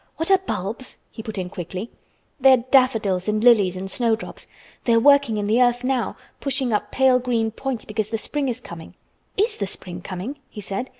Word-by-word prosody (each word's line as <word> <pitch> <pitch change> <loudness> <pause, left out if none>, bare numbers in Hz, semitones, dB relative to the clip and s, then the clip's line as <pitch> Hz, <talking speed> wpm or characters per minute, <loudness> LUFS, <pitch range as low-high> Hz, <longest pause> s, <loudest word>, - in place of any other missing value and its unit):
"What 325 +4 -1
are 385 - +6
bulbs?" 235 - -5
he 220 - -8
put 220 -1 -7
in 180 -1 -4
quickly. 185 +3 -6 0.5
"They 265 0 +7
are - - +6
daffodils 220 -9 +3
and 215 +1 0
lilies 205 -7 +5
and 190 +1 -6
snowdrops. 230 -1 -1 0.4
They 235 - +3
are 230 - +5
working 280 -3 +5
in 205 - -1
the 220 +4 +3
earth 245 0 +3
now—pushing 260 0 -2
up 210 - -1
pale 260 -1 +4
green 235 -3 0
points 255 0 -4
because 215 0 -2
the 225 - -1
spring 280 +4 -2
is 245 0 -3
coming." 170 -8 -11 0.4
"Is 425 +5 +1
the 200 - -2
spring 180 -1 -7
coming?" 200 +11 -6
he 215 - -10
said. 200 +5 -4
230 Hz, 195 wpm, -23 LUFS, 200-260 Hz, 0.5 s, They